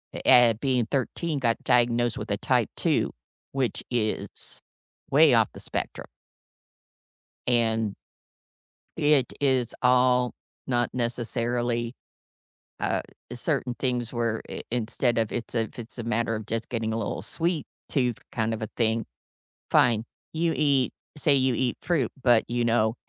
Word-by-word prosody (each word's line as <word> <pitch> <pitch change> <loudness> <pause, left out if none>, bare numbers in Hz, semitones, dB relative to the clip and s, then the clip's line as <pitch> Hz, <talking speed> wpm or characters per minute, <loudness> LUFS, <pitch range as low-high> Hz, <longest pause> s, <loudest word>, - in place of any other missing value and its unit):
uh - - -4
eh, 120 -2 +7
being 125 -4 +1
13, 145 +3 -1
got 115 -3 +2
diagnosed 120 -1 +2
with - - -5
a - - +1
type - - +1
2, - - +1 0.4
which 135 -3 -1
is 110 -3 -3 0.5
way - - +6
off - - +4
the - - -10
spectrum. - - -4 1.4
And 115 -3 +1 1.0
it 145 -4 +3
is 130 -4 +1
all 125 0 +4 0.3
not 120 -2 +1
necessarily, 120 0 -1 0.9
uh, - - 0 0.3
certain 125 - -1
things 125 -3 -1
where 115 -2 -1
i - - -5
instead 120 +1 0
of 110 -2 0
it's 120 - -4
a 115 - +2
if 110 - -8
it's 120 +1 -9
a - - -2
matter 115 0 0
of 110 - -7
just 115 0 -2
getting 115 -2 -1
a - - -1
little 105 - -3
sweet 165 -2 -1 0.2
tooth 125 -5 +1 0.2
kind 110 -1 0
of 110 - -6
a 110 - -2
thing, 115 -1 +1 0.7
fine. 115 -3 +4 0.3
You 165 +1 +1
eat 140 -4 +2 0.3
say 145 0 +3
you 130 -1 +2
eat 125 -2 0
fruit, 150 -10 0
but 120 -3 +5
you 120 0 0
know, 115 -1 +2
120 Hz, 145 wpm, -26 LUFS, 115-130 Hz, 1.4 s, eh